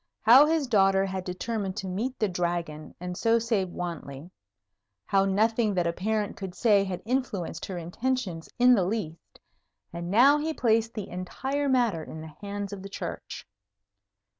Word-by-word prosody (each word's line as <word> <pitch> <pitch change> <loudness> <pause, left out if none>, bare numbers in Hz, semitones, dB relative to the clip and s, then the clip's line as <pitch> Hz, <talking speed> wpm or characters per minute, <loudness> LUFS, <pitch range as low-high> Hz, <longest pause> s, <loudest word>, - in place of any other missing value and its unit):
How 260 +6 +8
his 320 -2 +1
daughter 195 -5 +3
had 190 -1 -4
determined 195 +2 -3
to 195 - -4
meet 225 +8 -3
the 215 - +1
Dragon, 170 -4 -3
and 180 0 -5
so 230 +4 +3
save 225 -5 0
Wantley; 170 -3 -6 0.7
how 195 0 +2
nothing 215 +2 +2
that 175 -1 +1
a 170 - 0
parent 210 +3 -1
could 190 -2 -7
say 210 -4 +4
had 185 -2 -5
influenced 240 -7 -2
her 185 - -5
intentions 180 0 -3
in 250 +1 +6
the 200 -6 +3
least; 175 -4 -5 0.5
and 170 0 -5
now 265 +9 +6
he 315 +1 -2
placed 225 -1 +1
the 210 -3 -4
entire 265 +11 -3
matter 235 -11 +2
in 160 - -9
the 155 -1 -9
hands 205 0 -5
of 195 - -7
the 195 - -8
Church. - - -6
195 Hz, 165 wpm, -27 LUFS, 180-230 Hz, 0.7 s, How